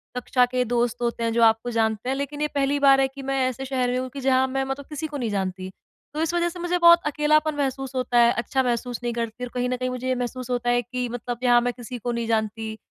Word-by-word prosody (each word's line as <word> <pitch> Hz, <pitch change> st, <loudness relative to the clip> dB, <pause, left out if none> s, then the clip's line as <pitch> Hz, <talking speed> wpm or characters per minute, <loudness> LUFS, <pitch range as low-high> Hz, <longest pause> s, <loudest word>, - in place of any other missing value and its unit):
कक्षा 250 Hz, 0 st, +2 dB
के 250 Hz, 0 st, 0 dB
दोस्त 240 Hz, -1 st, +1 dB
होते 235 Hz, -1 st, -1 dB
हैं 230 Hz, -, +1 dB
जो 235 Hz, 0 st, +3 dB
आपको 225 Hz, +1 st, +3 dB
जानते 220 Hz, +1 st, 0 dB
हैं 265 Hz, -, 0 dB
लेकिन 280 Hz, +2 st, -4 dB
ये 300 Hz, -, +2 dB
पहली 280 Hz, 0 st, +1 dB
बार 275 Hz, -1 st, +6 dB
है 270 Hz, -, +3 dB
कि 270 Hz, +1 st, -11 dB
मैं 270 Hz, -, 0 dB
ऐसे 255 Hz, +1 st, -4 dB
शहर 255 Hz, -2 st, 0 dB
में 250 Hz, -, 0 dB
हूँ 255 Hz, 0 st, -4 dB
कि 275 Hz, -, -8 dB
जहाँ 260 Hz, 0 st, +3 dB
मैं 270 Hz, +1 st, -1 dB
मतलब 270 Hz, +1 st, -5 dB
किसी 310 Hz, +1 st, -4 dB
को 295 Hz, -1 st, -6 dB
नहीं 240 Hz, -5 st, -2 dB
जानती। 190 Hz, -2 st, -3 dB, 0.4 s
तो 305 Hz, -, -2 dB
इस 325 Hz, +1 st, 0 dB
वजह 345 Hz, 0 st, +1 dB
से 350 Hz, +1 st, -9 dB
मुझे 350 Hz, +1 st, 0 dB
बहुत 340 Hz, 0 st, +7 dB
अकेलापन 300 Hz, +1 st, +2 dB
महसूस 270 Hz, -1 st, -3 dB
होता 250 Hz, -1 st, 0 dB
है, 235 Hz, 0 st, +6 dB
अच्छा 260 Hz, +3 st, 0 dB
महसूस 245 Hz, 0 st, -2 dB
नहीं 240 Hz, -1 st, -1 dB
करती 230 Hz, +1 st, -4 dB
और 250 Hz, -, -4 dB
कहीं 250 Hz, 0 st, -1 dB
न 255 Hz, -, 0 dB
कहीं 255 Hz, 0 st, -2 dB
मुझे 255 Hz, 0 st, -4 dB
ये 255 Hz, -, +1 dB
महसूस 250 Hz, 0 st, -4 dB
होता 245 Hz, -1 st, -1 dB
है 245 Hz, 0 st, +3 dB
कि 250 Hz, +1 st, -4 dB
मतलब 240 Hz, 0 st, -5 dB
यहाँ 240 Hz, -1 st, +5 dB
मैं 245 Hz, 0 st, -1 dB
किसी 245 Hz, 0 st, -8 dB
को 240 Hz, +1 st, -3 dB
नहीं 235 Hz, -1 st, -2 dB
जानती 220 Hz, 0 st, -2 dB
250 Hz, 275 wpm, -24 LUFS, 235-270 Hz, 0.4 s, बहुत